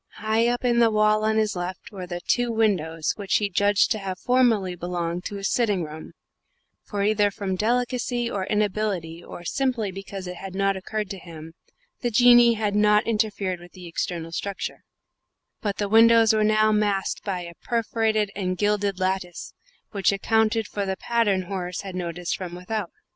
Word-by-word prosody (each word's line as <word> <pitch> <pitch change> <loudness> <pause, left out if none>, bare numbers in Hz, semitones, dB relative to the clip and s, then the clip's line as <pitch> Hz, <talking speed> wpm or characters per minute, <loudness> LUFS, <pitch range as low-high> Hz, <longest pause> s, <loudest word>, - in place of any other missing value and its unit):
High 220 +2 +1
up 245 +1 -1
in 240 -1 +3
the 230 -1 +5
wall, 215 0 +3
on 220 0 +2
his 215 -2 +1
left, 185 +6 -5
were 185 -3 -7
the 175 0 -5
two 245 +5 +1
windows 175 -8 0
which 200 -2 -1
he 205 -2 +1
judged 205 +2 +3
to 215 - +1
have 190 -2 -4
formerly 230 -7 +2
belonged 175 0 -3
to 205 - -4
his 195 0 -2
sitting 205 -7 +1
room 155 0 -9 0.7
(for 200 -2 -3
either 205 0 +3
from 195 -1 -3
delicacy 240 +3 0
or 195 -5 -3
inability, 200 -5 -1
or 175 - -10
simply 245 -3 -1
because 195 0 -7
it 180 0 -6
had 190 0 -8
not 195 0 +1
occurred 210 +2 -4
to 195 - -6
him, 165 -2 -11 0.5
the 245 - -1
Jinnee 240 0 +6
had 210 -2 -1
not 210 0 +4
interfered 210 -5 -1
with 175 0 -15
the 180 -1 -11
external 165 0 -4
structure), 200 +3 -4 0.8
but 205 -2 -2
the 205 - -1
windows 225 +1 +6
were 215 0 +2
now 215 0 +3
masked 205 -2 0
by 190 -3 -2
a 170 -1 -8
perforated 220 -3 0
and 185 -2 -2
gilded 205 -1 0
lattice, 185 -2 -2 0.4
which 200 -2 +2
accounted 220 +2 +1
for 205 -1 -3
the 190 -1 -2
pattern 215 -5 +1
Horace 180 -1 -4
had 195 -2 -7
noticed 175 -1 -3
from 180 -2 -6
without. 180 +1 -4
205 Hz, 180 wpm, -24 LUFS, 185-220 Hz, 0.8 s, Jinnee